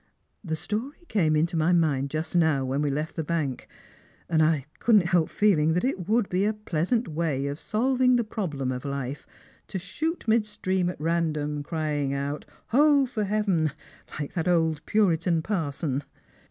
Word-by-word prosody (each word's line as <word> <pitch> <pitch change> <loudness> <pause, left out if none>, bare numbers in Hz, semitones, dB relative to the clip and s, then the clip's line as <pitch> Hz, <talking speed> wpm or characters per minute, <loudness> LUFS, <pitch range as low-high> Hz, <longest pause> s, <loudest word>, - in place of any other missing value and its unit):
The 160 -4 -2
story 220 - -4
came 160 -8 +2
into 165 +3 +1
my 160 +2 +3
mind 145 -5 +2
just 155 +4 -3
now, 160 -6 +3
when 135 +2 -1
we 150 - +1
left 150 +3 -3
the 160 - -2
bank, 150 -5 -2 0.6
and 160 -2 +2
I 155 -4 +2
couldn't 215 -6 +4
help 175 -2 +2
feeling 160 -7 +3
that 180 - 0
it 190 -8 -2
would 225 -2 +3
be 185 +2 0
a 215 +1 +2
pleasant 210 +4 -1
way 155 -4 -1
of 140 +2 -3
solving 255 +3 +2
the 240 - +2
problem 155 - -3
of 125 0 -4
life 140 0 -4 0.4
to 195 - -4
shoot 310 - -3
mid 220 -1 +3
stream 185 -3 -1
at 180 - -6
random, 155 -2 -1
crying 145 -2 -2
out, 140 +2 -3
' - - -36
Ho, 285 +2 +5
for 220 -5 -2
heaven! 195 -7 +1 0.2
' - - -14
like 145 - -4
that 165 -2 -2
old 160 -3 +2
puritac 170 -5 +2
parson." 150 -7 -2
165 Hz, 180 wpm, -26 LUFS, 150-210 Hz, 0.6 s, Ho